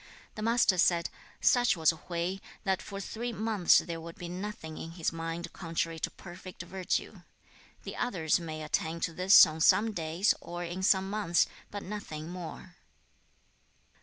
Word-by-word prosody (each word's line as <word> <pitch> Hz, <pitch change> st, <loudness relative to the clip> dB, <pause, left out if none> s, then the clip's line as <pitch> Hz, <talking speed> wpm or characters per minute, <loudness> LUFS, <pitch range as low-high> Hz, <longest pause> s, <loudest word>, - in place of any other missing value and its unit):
The 215 Hz, -, -7 dB
Master 225 Hz, -4 st, +3 dB
said, 170 Hz, -1 st, +3 dB, 0.3 s
'Such 245 Hz, -6 st, +4 dB
was 160 Hz, -1 st, +4 dB
Hui 170 Hz, +3 st, -3 dB, 0.2 s
that 190 Hz, -2 st, 0 dB
for 195 Hz, -, -7 dB
three 235 Hz, +4 st, -4 dB
months 215 Hz, -5 st, +3 dB
there 165 Hz, -2 st, -2 dB
would 165 Hz, 0 st, -9 dB
be 175 Hz, -, -7 dB
nothing 180 Hz, -4 st, -6 dB
in 165 Hz, -, -7 dB
his 165 Hz, -1 st, -2 dB
mind 165 Hz, +1 st, -5 dB
contrary 165 Hz, -1 st, -3 dB
to -, -, -1 dB
perfect 185 Hz, 0 st, -10 dB
virtue. 185 Hz, +2 st, -3 dB, 0.6 s
The -, -, -6 dB
others 180 Hz, -10 st, +1 dB
may 155 Hz, -2 st, -6 dB
attain 160 Hz, +2 st, -1 dB
to 165 Hz, -, -1 dB
this 185 Hz, +4 st, +8 dB
on 160 Hz, -1 st, -5 dB
some 220 Hz, +7 st, +5 dB
days 170 Hz, +2 st, +1 dB
or 175 Hz, 0 st, -6 dB
in 175 Hz, +2 st, -5 dB
some 190 Hz, 0 st, +3 dB
months, 200 Hz, -4 st, +2 dB, 0.2 s
but 205 Hz, -1 st, -6 dB
nothing 170 Hz, -6 st, -6 dB
more.' 180 Hz, 0 st, -8 dB
175 Hz, 160 wpm, -30 LUFS, 165-195 Hz, 0.6 s, this